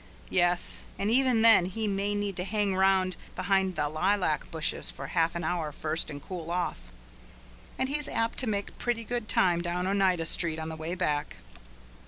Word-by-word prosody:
Yes, 175 -1 +3 0.2
and 205 +2 0
even 250 -2 +3
then 225 -6 +7
he 215 +4 -2
may 200 +1 0
need 205 -2 -2
to 180 - -1
hang 205 -1 0
round 190 -1 +3 0.2
behind 190 0 +1
the 150 -2 0
lilac 165 +1 0
bushes 160 -2 -2
for 135 - -7
half 165 +3 +1
an 170 - -3
hour 160 -2 -1
first, 155 +2 -2
and 145 - -6
cool 165 +1 -7
off. 170 - -3 0.9
And 260 - 0
he's 290 +1 -3
apt 230 0 -1
to 260 - -1
make 200 -2 -2
pretty 240 -1 -1
good 240 -1 -4
time 175 -2 +3
down 175 +1 -2
Oneida 190 -3 +2
Street 160 0 0
on 160 0 -4
the 160 - -5
way 160 +3 -3
back. 150 -5 -1
185 Hz, 185 wpm, -29 LUFS, 165-205 Hz, 0.9 s, then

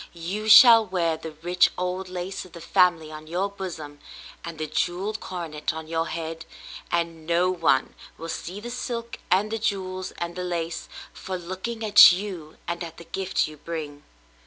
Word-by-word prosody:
You 195 +6 -4
shall 225 +1 +10
wear 175 -5 0
the 160 0 -8
rich 180 +1 +4
old 180 +1 -3
lace 180 +1 -5
of 185 - -16
the 170 - -9
family 170 -1 +2
on 155 0 -10
your 180 +5 -1
bosom, 160 -7 -7 0.4
and 170 -1 -7
the 155 - -3
jewelled 185 +7 -2
coronet 170 -5 -4
on 160 0 -7
your 165 0 -1
head; 165 0 -5 0.5
and 165 -2 -2
no 175 +2 +2
one 165 -7 +1 0.2
will 165 - -7
see 180 +3 -5
the 240 +3 -7
silk 235 -1 -5
and 200 +4 +2
the 225 - -2
jewels 185 -4 -2
and 170 0 -5
the 180 - -4
lace, 170 -2 -3 0.2
for 190 -1 -5
looking 190 +6 -5
at 205 -2 +10
you 180 -5 -5
and 170 0 -3
at 165 -1 -9
the 170 - -10
gift 190 +2 -1
you 155 0 -11
bring. 150 -2 -6
175 Hz, 180 wpm, -25 LUFS, 165-190 Hz, 0.5 s, shall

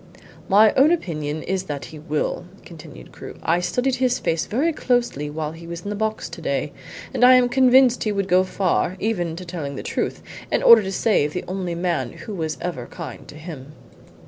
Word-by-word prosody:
"My 210 +2 +6
own 275 +3 +5
opinion 155 - -2
is 190 +1 -2
that 145 -5 -5
he 155 - -11
will," 150 +3 -2 0.2
continued 155 - -12
Crewe. - - -10
"I 170 +2 +2
studied 250 +8 0
his 255 -1 +1
face 160 -1 -1
very 300 +9 0
closely 240 - 0
while 155 0 -4
he 165 +1 -11
was 170 0 -6
in 205 - -5
the - - -3
box 220 +1 -2
to - - -9
day, - - -2 0.4
and - - 0
I 255 +1 +9
am 250 -1 +5
convinced 255 0 +4
he 215 - 0
would 200 -2 -1
go 185 0 +4
far 185 -1 0
even 175 -7 -1
to 180 +2 -8
telling 160 -5 -5
the - - -6
truth - - -3 0.3
in - - +1
order 230 -1 +9
to 190 -1 -4
save 185 -8 +1
the 180 - -4
only 180 -2 -3
man 175 0 -2
who 215 - -8
was 160 -5 -3
ever 150 -9 -4
kind - - -9
to - - -12
him." 150 -3 -9
180 Hz, 205 wpm, -22 LUFS, 160-225 Hz, 0.4 s, I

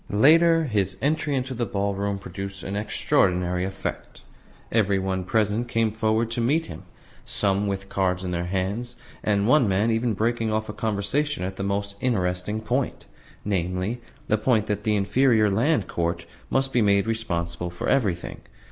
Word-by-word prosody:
Later, 165 +9 +5
his 100 - -1
entry 150 0 0
into 130 0 -2
the 120 -2 -2
ballroom 100 0 -1
produced 95 0 -7
an 95 - -4
extraordinary 90 -3 +1
effect. 95 0 -6 0.5
Every 100 -3 +2
one 95 -1 -1
present 110 +4 0
came 115 -2 +1
forward 110 +1 0
to 120 - -1
meet 150 +8 +2
him, - - -10 0.4
some 100 0 0
with 100 0 -3
cards 95 -2 0
in 90 - -3
their 85 0 -2
hands, 100 +7 -2 0.3
and 105 -1 +1
one 130 -2 +5
man 100 +4 +2
even 115 0 0
breaking 115 +1 0
off 110 0 -1
a - - -4
conversation 110 +5 -1
at 95 +1 -3
the - - -6
most 100 +1 -2
interesting 100 -2 -1
point 125 +4 -2 0.4
namely, 95 +4 -1 0.3
the 110 - +2
point 110 -2 +2
that 105 -1 -3
"the 105 -1 +2
Inferior 105 +1 +3
Land 145 +11 +2
Court 85 0 -2 0.2
must 135 0 +1
be 120 - +3
made 100 -1 +3
responsible 90 -6 -2
for 85 - -5
everything." 100 -10 0
105 Hz, 165 wpm, -25 LUFS, 95-115 Hz, 0.5 s, Later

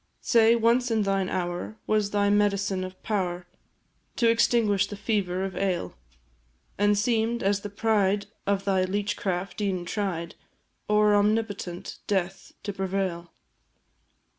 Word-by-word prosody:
Say, 230 -1 +5
once 235 +2 +2
in 220 -2 +1
thine 195 -1 0
hour, 180 +3 -3
was 215 -2 +1
thy 205 0 +2
medicine 200 -2 +1
of 185 0 -8
power 180 -5 -2 0.7
To 235 - +2
extinguish 230 -4 +3
the 205 - -7
fever 195 -3 -1
of 195 -1 -4
ail? 185 -3 -1 0.9
And 205 0 +3
seem'd, 230 +2 +1
as 200 +1 +1
the 205 - -6
pride 205 -1 +1 0.2
of 195 -1 0
thy 190 -2 +2
leech 205 +2 -1
craft 185 +1 -3
e'en 185 -3 -1
tried 175 -4 -3 0.6
O'er 210 0 +4
omnipotent 205 -3 -1
death 190 -3 -2
to 205 - -4
prevail? 190 -3 -3
200 Hz, 135 wpm, -26 LUFS, 190-210 Hz, 0.9 s, Say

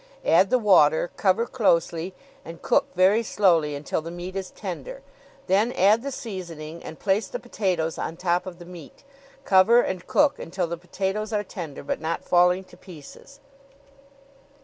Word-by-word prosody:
Add 185 +4 +4
the 255 - +4
water, 175 -8 +4
cover 195 +4 +2
closely, 175 -6 0 0.3
and 165 +1 -11
cook 280 - +2
very 195 +5 +4
slowly 170 -9 +2
until 145 +2 -3
the 165 - -7
meat 175 +2 -7
is 190 -1 -4
tender; - - -7 0.4
then 205 +6 +2
add 210 +4 +4
the 280 - -4
seasoning 170 - -7
and 160 - -9
place 200 +2 0
the - - -5
potatoes 180 - -2
on 165 - -4
top 175 0 0
of 180 -2 -8
the 175 - -12
meat. 175 - -13 0.4
Cover 195 +5 +5
and 185 -5 -4
cook 290 -1 +2
until 180 +2 -3
the 170 0 -4
potatoes 190 +5 -4
are 210 -1 0
tender, 170 -7 -8
but - - -3
not 165 +1 -3
falling 180 +1 +3
to - - -18
pieces.'" 185 - -14
185 Hz, 165 wpm, -24 LUFS, 170-210 Hz, 0.4 s, Cover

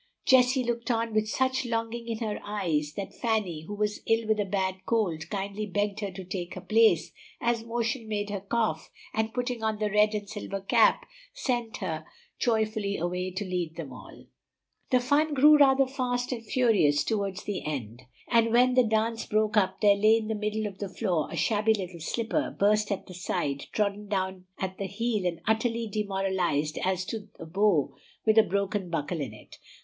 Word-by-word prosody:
Jessie 255 0 +5
looked 235 0 -2
on 230 -1 0
with 215 0 +1
such 260 +2 +1
longing 230 0 -3
in 230 -1 -2
her 210 - -3
eyes 165 -8 -1
that 200 +3 -6
Fanny, 200 -9 -1
who 205 - -5
was 210 0 -1
ill 225 0 +2
with 215 -1 +2
a 205 - +1
bad 190 -1 -2
cold, 190 -9 0
kindly 200 +1 -3
begged 205 +1 -1
her 205 -2 -2
to 190 0 -8
take 180 -1 -5
her - - -6
place, 225 +1 +3 0.3
as 235 -1 0
motion 230 +1 -2
made 205 -1 -2
her 200 - -2
cough, 220 +3 -1 0.2
and 220 0 0
putting 245 -1 -2
on 220 -1 0
the 210 -1 -1
red 210 +1 +4
and 205 -1 -4
silver 200 -2 -5
cap 220 +4 +3 0.3
sent 240 -4 -2
her 160 -5 -3 0.4
joyfully 215 -3 0
away 180 +2 -2
to 185 +3 -4
lead 175 -3 -3
them 155 -6 -7
all. - - -12 0.6
The 255 - +4
fun 290 +4 +2
grew 300 +3 +8
rather 270 -1 +5
fast 250 -2 -2
and 235 -3 -4
furious 205 - +3
toward 200 0 -1
the 205 -3 -3
end, 125 -6 -5 0.3
and 230 -1 +3
when 250 +2 +5
the 255 0 +5
dance 225 +1 0
broke 215 0 +1
up 190 -2 +2
there 205 -2 +7
lay 215 +2 +5
in 220 -1 -4
the - - +1
middle 215 0 -2
of 200 -2 -6
the 200 - -4
floor 185 -6 -1
a - - -6
shabby 220 0 +2
little 180 -4 -6
slipper, 230 - -1
burst 210 +1 +3
at 200 - -2
the 185 - -11
side, 145 -5 -2
trodden 205 0 -1
down 190 -2 -2
at 190 0 -4
the 195 - -2
heel, 210 -1 -1
and 170 -2 -3
utterly 225 +1 +1
demoralized 190 -7 -1
as 185 0 0
to 215 0 -6
the 165 - -8
bow 180 -3 +2 0.3
with 220 0 +6
a - - +7
broken 200 -1 -1
buckle 165 0 -2
in 130 -6 -4
it. 110 - -14
210 Hz, 195 wpm, -28 LUFS, 190-230 Hz, 0.6 s, grew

